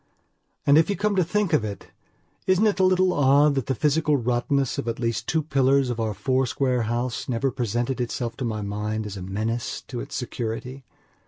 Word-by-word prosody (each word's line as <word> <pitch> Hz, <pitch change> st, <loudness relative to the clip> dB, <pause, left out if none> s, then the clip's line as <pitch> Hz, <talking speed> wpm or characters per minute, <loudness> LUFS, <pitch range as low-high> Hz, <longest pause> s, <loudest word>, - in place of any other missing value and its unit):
And, 140 Hz, +2 st, +6 dB
if 160 Hz, -, +2 dB
you 200 Hz, -, +1 dB
come 210 Hz, 0 st, 0 dB
to 185 Hz, -, +3 dB
think 205 Hz, +1 st, 0 dB
of 150 Hz, -, +3 dB
it, 100 Hz, -4 st, -6 dB, 0.6 s
isn't 185 Hz, +3 st, +4 dB
it 205 Hz, -2 st, +2 dB
a -, -, +4 dB
little 185 Hz, 0 st, +3 dB
odd 145 Hz, +1 st, +4 dB
that 135 Hz, -3 st, -2 dB
the 135 Hz, -, 0 dB
physical 150 Hz, +2 st, +2 dB
rottenness 125 Hz, +2 st, 0 dB
of -, -, -4 dB
at 115 Hz, -, -2 dB
least 115 Hz, -1 st, -2 dB
two 160 Hz, -1 st, +1 dB
pillars 135 Hz, -2 st, +2 dB
of 120 Hz, -, -4 dB
our 110 Hz, -2 st, -1 dB
four 130 Hz, +5 st, +1 dB
square 125 Hz, 0 st, 0 dB
house 120 Hz, +1 st, -2 dB
never 130 Hz, +2 st, 0 dB
presented 120 Hz, +2 st, -2 dB
itself 120 Hz, -1 st, -3 dB
to 135 Hz, -, -4 dB
my 110 Hz, -3 st, -2 dB
mind 105 Hz, +2 st, -3 dB
as 105 Hz, -1 st, -6 dB
a 95 Hz, -, -7 dB
menace 110 Hz, +6 st, -3 dB
to 125 Hz, -, -4 dB
its -, -, -6 dB
security? 125 Hz, +2 st, -4 dB
125 Hz, 210 wpm, -24 LUFS, 115-145 Hz, 0.6 s, And